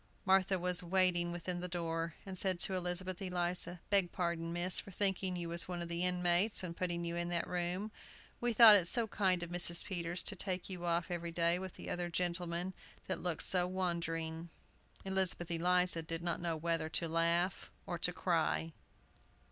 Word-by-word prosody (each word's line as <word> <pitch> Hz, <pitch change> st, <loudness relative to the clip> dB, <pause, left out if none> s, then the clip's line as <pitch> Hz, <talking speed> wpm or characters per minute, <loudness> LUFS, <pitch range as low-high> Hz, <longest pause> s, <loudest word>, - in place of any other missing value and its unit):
Martha 190 Hz, 0 st, +3 dB
was 180 Hz, 0 st, +1 dB
waiting 175 Hz, -1 st, +2 dB
within 175 Hz, +1 st, -4 dB
the 180 Hz, -, -4 dB
door, 165 Hz, -2 st, -3 dB
and 190 Hz, -1 st, -6 dB
said 185 Hz, -1 st, 0 dB
to 190 Hz, -, 0 dB
Elizabeth 180 Hz, 0 st, -3 dB
Eliza, 180 Hz, -1 st, -1 dB
"Beg 195 Hz, -3 st, +3 dB
pardon, 170 Hz, -2 st, -2 dB
miss, 175 Hz, +2 st, +2 dB
for -, -, -9 dB
thinking 190 Hz, -1 st, +1 dB
you 175 Hz, -1 st, -4 dB
was 170 Hz, 0 st, -1 dB
one 180 Hz, -1 st, -4 dB
of 170 Hz, 0 st, -5 dB
the 170 Hz, +1 st, -1 dB
inmates, 180 Hz, +3 st, +3 dB
and 170 Hz, -2 st, -5 dB
putting 170 Hz, -1 st, -2 dB
you 170 Hz, 0 st, -3 dB
in 175 Hz, 0 st, -2 dB
that 170 Hz, -1 st, -1 dB
room. 180 Hz, +4 st, -2 dB, 0.5 s
We 240 Hz, 0 st, 0 dB
thought 225 Hz, -1 st, +9 dB
it 180 Hz, -4 st, +3 dB
so 235 Hz, +4 st, +3 dB
kind 190 Hz, -4 st, +1 dB
of 170 Hz, -, -7 dB
Mrs. 175 Hz, -1 st, +4 dB
Peters 175 Hz, -2 st, -2 dB
to 205 Hz, -, -1 dB
take 185 Hz, 0 st, -4 dB
you 175 Hz, -1 st, -5 dB
off 170 Hz, +1 st, 0 dB
every 170 Hz, -1 st, -3 dB
day 170 Hz, +1 st, +1 dB
with 185 Hz, -1 st, -7 dB
the -, -, -7 dB
other 175 Hz, 0 st, -2 dB
gentlemen, 175 Hz, +1 st, -2 dB, 0.3 s
that 185 Hz, -, -3 dB
looked 175 Hz, -3 st, -1 dB
so 180 Hz, -2 st, +2 dB
wandering." 170 Hz, -3 st, -3 dB, 0.6 s
Elizabeth 190 Hz, -3 st, +1 dB
Eliza 180 Hz, 0 st, +2 dB
did 165 Hz, +1 st, -5 dB
not 170 Hz, -1 st, -1 dB
know 170 Hz, -2 st, -1 dB
whether 165 Hz, 0 st, -1 dB
to 165 Hz, -, +1 dB
laugh 170 Hz, +3 st, +1 dB, 0.2 s
or -, -, -4 dB
to -, -, +3 dB
cry. 80 Hz, +1 st, 0 dB
175 Hz, 190 wpm, -34 LUFS, 170-185 Hz, 0.6 s, thought